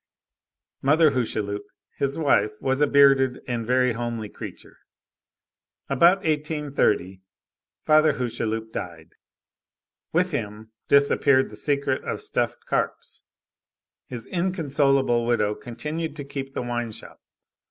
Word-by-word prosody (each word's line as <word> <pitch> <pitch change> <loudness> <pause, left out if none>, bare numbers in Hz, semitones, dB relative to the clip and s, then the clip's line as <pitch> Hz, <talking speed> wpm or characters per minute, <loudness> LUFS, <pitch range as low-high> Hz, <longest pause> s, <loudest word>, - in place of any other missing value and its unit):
Mother 155 +2 +4
Hucheloup, 105 -5 -2 0.3
his 140 0 -1
wife, 105 -9 +1
was 135 +1 -1
a 150 - +5
bearded 135 -2 +4
and 120 -2 -2
a - - -6
very 125 0 +3
homely 115 -2 -4
creature. - - -10 1.1
About 170 +8 +4
1830, 145 - 0 0.6
Father 155 0 +5
Hucheloup 115 -3 -3
died. 85 -4 -7 1.0
With 180 +2 +1
him 110 -5 -5 0.2
disappeared 140 -2 +3
the - - -9
secret 140 +2 0
of - - -3
stuffed - - -2
carps. - - -3 0.9
His 120 -3 -7
inconsolable 140 -9 +1
widow 115 -3 +1
continued 150 +8 -5
to 145 - -6
keep 135 -1 -6
the - - -3
wine 120 -1 -3
shop. - - -10
130 Hz, 115 wpm, -24 LUFS, 115-145 Hz, 1.1 s, a